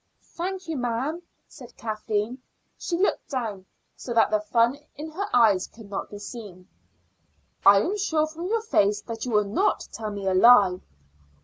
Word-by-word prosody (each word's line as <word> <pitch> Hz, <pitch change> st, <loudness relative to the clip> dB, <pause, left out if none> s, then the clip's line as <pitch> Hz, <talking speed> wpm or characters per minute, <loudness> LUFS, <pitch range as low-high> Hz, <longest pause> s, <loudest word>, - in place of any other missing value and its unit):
"Thank 370 Hz, +1 st, -4 dB
you, 320 Hz, -2 st, -3 dB
ma'am," 250 Hz, +7 st, -2 dB, 0.3 s
said 245 Hz, -3 st, -14 dB
Kathleen. 215 Hz, +2 st, -3 dB, 0.4 s
She 340 Hz, -, -2 dB
looked 385 Hz, -, 0 dB
down, 220 Hz, -8 st, -4 dB, 0.3 s
so 240 Hz, -, -6 dB
that 225 Hz, -, +4 dB
the 215 Hz, -, +3 dB
fun 230 Hz, +5 st, +1 dB, 0.2 s
in 310 Hz, +2 st, -7 dB
her 395 Hz, +6 st, -3 dB
eyes 215 Hz, -6 st, +4 dB
could 220 Hz, -3 st, -15 dB
not 195 Hz, -, -4 dB
be 205 Hz, -, -8 dB
seen. 205 Hz, -4 st, -9 dB, 1.0 s
"I 200 Hz, 0 st, +7 dB
am 385 Hz, -, -1 dB
sure 320 Hz, -6 st, +1 dB
from 325 Hz, +3 st, -6 dB
your 450 Hz, +2 st, 0 dB
face 205 Hz, -, +2 dB
that 225 Hz, 0 st, -6 dB
you 250 Hz, -, -3 dB
will 210 Hz, -1 st, +3 dB
not 210 Hz, -, 0 dB
tell 220 Hz, -1 st, -5 dB
me 200 Hz, -1 st, -6 dB
a 190 Hz, -, +1 dB
lie." 195 Hz, -3 st, +6 dB
230 Hz, 175 wpm, -25 LUFS, 205-310 Hz, 1.0 s, I